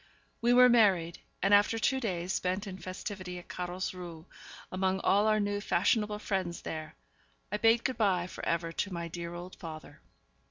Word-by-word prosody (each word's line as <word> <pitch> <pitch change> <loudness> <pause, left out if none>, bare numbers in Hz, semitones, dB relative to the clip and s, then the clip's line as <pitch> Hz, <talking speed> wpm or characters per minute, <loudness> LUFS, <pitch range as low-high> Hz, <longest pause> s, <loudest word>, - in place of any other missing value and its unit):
We 240 +1 +3
were 250 +1 +8
married; 195 -8 +3 0.2
and 195 +1 +4
after 205 +2 +5
two 265 +5 +1
days 185 -6 -2
spent 185 +3 -1
in 190 -2 -7
festivity 185 0 -6
at 175 - -11
Carlsruhe, 180 -2 -5 0.5
among 190 0 0
all 205 +2 +3
our 215 0 +3
new 205 0 -1
fashionable 210 +3 +1
friends 190 -5 -3
there, 155 -1 -6 0.6
I 210 - 0
bade 225 +2 +4
good 260 - -1
by 185 -5 +2
for 185 - -9
ever 170 0 -1
to 200 +4 -2
my 170 -1 -4
dear 170 0 -6
old 175 +1 -8
father. 155 -2 -9
185 Hz, 170 wpm, -31 LUFS, 175-210 Hz, 0.6 s, were